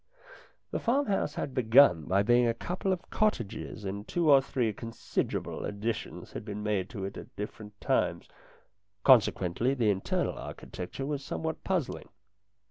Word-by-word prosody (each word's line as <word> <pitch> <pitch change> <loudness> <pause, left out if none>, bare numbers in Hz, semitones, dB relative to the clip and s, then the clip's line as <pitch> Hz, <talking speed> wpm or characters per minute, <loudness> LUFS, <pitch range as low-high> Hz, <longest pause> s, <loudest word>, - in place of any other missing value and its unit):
The - - -1
farmhouse 230 - +1
had 135 - -3
begun 115 - +5
by 100 +5 +2
being 120 +2 +4
a 115 - +1
couple 180 +8 -2
of 185 -1 -2
cottages 115 - -1
and 100 +2 -5
two 170 -3 +2
or 135 -1 +8
three 125 -4 -1
considerable 115 +3 -3
additions 105 +2 -4
had - - -6
been 105 -1 -5
made 100 -3 0
to 100 -6 -5
it 100 - -6
at - - -10
different 105 0 -7
times; - - 0 0.8
consequently, 120 -1 +4
the 115 -5 +3
internal 95 -1 -1
architecture 90 +9 -6
was 145 -1 -3
somewhat 160 +3 -4
puzzling. 185 -8 -2
115 Hz, 145 wpm, -30 LUFS, 105-140 Hz, 0.8 s, or